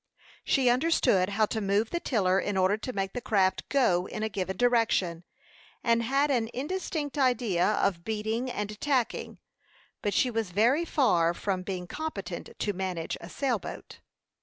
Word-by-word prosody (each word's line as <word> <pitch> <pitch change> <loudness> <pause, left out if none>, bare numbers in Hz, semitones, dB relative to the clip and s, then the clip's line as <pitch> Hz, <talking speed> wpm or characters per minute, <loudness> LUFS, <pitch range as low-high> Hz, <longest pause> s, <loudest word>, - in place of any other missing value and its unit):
She 265 -3 +2
understood 245 - +3
how 215 +2 +2
to 220 +1 -3
move 200 +3 +1
the 345 - -1
tiller 195 - +1
in 205 -1 -2
order 190 +2 +3
to 220 +4 -5
make 195 -4 -3
the 245 - -4
craft 190 -5 +1
go 190 -10 +2
in 215 - -5
a 220 - 0
given 190 -2 -3
direction, 225 -8 +2 0.6
and 235 -1 +3
had 275 +5 +1
an 230 -4 +1
indistinct 295 0 -3
idea 235 -8 +2
of 190 -4 0
beating 220 +4 -2
and 210 -2 -5
tacking; 260 -5 -1 0.6
but 205 - -1
she 250 - +3
was 225 -4 -2
very 235 - +3
far 175 - +2
from 190 -1 -2
being 185 -1 -4
competent 195 - -5
to 205 - -1
manage 180 -3 -3
a 170 - -9
sailboat. 250 -4 -3
215 Hz, 160 wpm, -28 LUFS, 190-250 Hz, 0.6 s, understood